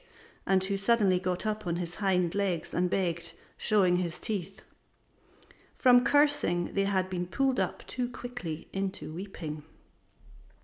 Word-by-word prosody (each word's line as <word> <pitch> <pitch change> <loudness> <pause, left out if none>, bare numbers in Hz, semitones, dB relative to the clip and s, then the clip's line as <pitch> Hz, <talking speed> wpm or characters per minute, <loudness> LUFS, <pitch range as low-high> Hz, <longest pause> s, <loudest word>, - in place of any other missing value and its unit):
and 190 -1 +3
who 195 +1 0
suddenly 195 -3 +3
got 185 +2 -2
upon 215 -5 -1
his 170 0 -5
hind 180 -4 +1
legs 190 -5 -1
and 180 +1 +1
begged, 175 -3 -1 0.2
showing 190 -5 +3
his 175 -2 -2
teeth. 195 -3 -4 1.1
From 245 -1 +6
cursing 285 - +3
they 195 0 +1
had 190 -2 +1
been 180 -1 -3
pulled 265 +5 +1
up - - -2
too 245 -1 -3
quickly 245 -12 -6
into 195 -5 -3
weeping. 165 -4 -6
190 Hz, 135 wpm, -29 LUFS, 175-215 Hz, 1.1 s, From